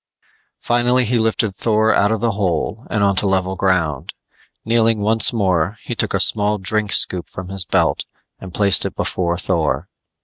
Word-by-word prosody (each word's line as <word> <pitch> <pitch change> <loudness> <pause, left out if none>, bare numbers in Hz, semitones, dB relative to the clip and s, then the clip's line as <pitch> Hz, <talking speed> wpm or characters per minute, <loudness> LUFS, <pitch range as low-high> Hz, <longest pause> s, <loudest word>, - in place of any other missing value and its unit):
Finally 120 +1 +1
he 120 +1 0
lifted 110 -2 0
Thor 110 +1 +1
out 100 +1 +2
of 110 -2 -2
the 115 -1 +1
hole 100 +3 -3
and 110 -3 0
onto 100 0 +2
level 95 -1 -1
ground. 85 -7 -1 0.5
Kneeling 115 -1 +2
once 110 +1 +4
more, 95 -3 0
he - - -5
took - - 0
a - - 0
small 105 0 +2
drink 105 +1 0
scoop 90 -2 +1
from 95 0 -8
his 95 -1 -2
belt - - 0 0.3
and 95 - -10
placed 100 +1 +3
it - - -5
before 85 -1 -2
Thor. 85 -4 -1
100 Hz, 170 wpm, -18 LUFS, 95-110 Hz, 0.5 s, once